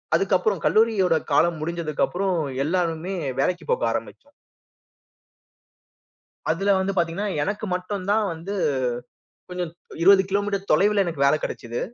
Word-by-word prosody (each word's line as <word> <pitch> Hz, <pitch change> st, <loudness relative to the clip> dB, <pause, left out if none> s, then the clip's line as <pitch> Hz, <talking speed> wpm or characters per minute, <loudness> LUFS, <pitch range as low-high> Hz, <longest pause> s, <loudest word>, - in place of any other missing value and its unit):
அதுக்கப்புறம் 195 Hz, -1 st, +1 dB
கல்லூரியோட 195 Hz, 0 st, +3 dB, 0.2 s
காலம் 165 Hz, +3 st, +3 dB
முடிஞ்சதுக்கப்புறம் 170 Hz, +3 st, -1 dB, 0.3 s
எல்லாருமே 175 Hz, +2 st, -1 dB, 0.2 s
வேலைக்குப் 170 Hz, +2 st, 0 dB
போக -, -, 0 dB
ஆரம்பிச்சோம். -, -, -6 dB, 2.2 s
அதில 195 Hz, +4 st, +2 dB
வந்து 195 Hz, +1 st, -1 dB
பார்த்தீங்கன்னா, 175 Hz, +5 st, 0 dB
எனக்கு 205 Hz, +2 st, -3 dB
மட்டும் 185 Hz, +1 st, -4 dB
தான் 215 Hz, 0 st, +2 dB
வந்து 170 Hz, +5 st, -6 dB, 0.9 s
கொஞ்சம் 180 Hz, -2 st, -4 dB, 0.3 s
20 190 Hz, +2 st, +7 dB
கிலோ 200 Hz, +1 st, +2 dB
மீட்டர் 200 Hz, -1 st, -3 dB
தொலைவுல 200 Hz, +5 st, +4 dB
எனக்கு 160 Hz, -5 st, -1 dB
வேல 140 Hz, -, +5 dB
கிடைச்சது. 120 Hz, -2 st, -4 dB
180 Hz, 115 wpm, -24 LUFS, 165-200 Hz, 2.2 s, 20